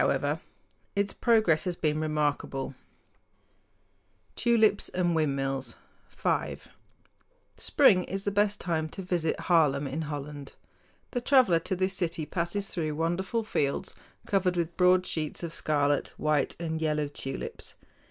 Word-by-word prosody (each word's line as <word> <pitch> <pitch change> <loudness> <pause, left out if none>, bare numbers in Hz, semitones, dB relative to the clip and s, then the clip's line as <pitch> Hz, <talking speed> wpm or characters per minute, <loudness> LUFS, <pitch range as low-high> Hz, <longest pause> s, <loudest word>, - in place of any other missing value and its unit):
[Illustration: - - +1 0.6
SCENE 180 -7 +2
IN 155 -1 -2
HAARLEM] 145 -1 +2
HOLLAND 135 0 -5 1.6
Tulips 220 -4 +3
and 175 -1 0
Windmills 135 -4 -1 0.3
FIVE - - -2 0.9
Spring 205 - +4
is 195 +1 -4
the 205 - 0
best 205 0 +1
time 160 -3 -1
to 190 - -7
visit 175 -3 -1
Haarlem 150 -5 +3
in 140 +4 -3
Holland. 145 -2 -6 0.6
The 245 - -2
traveler 250 -10 +5
to 185 - -3
this 185 +1 0
city 170 -4 -2
passes 175 +5 -1
through 155 -4 -2
wonderful 180 +8 -1
fields 140 -10 -1 0.3
covered 185 -2 +1
with 170 0 -1
broad 180 0 +4
sheets 155 0 -2
of 165 -1 -4
scarlet, 145 -3 +1
white, 150 -3 +1
and 160 -1 -3
yellow 150 -2 0
tulips. 135 -2 -6
165 Hz, 125 wpm, -28 LUFS, 150-190 Hz, 1.6 s, traveler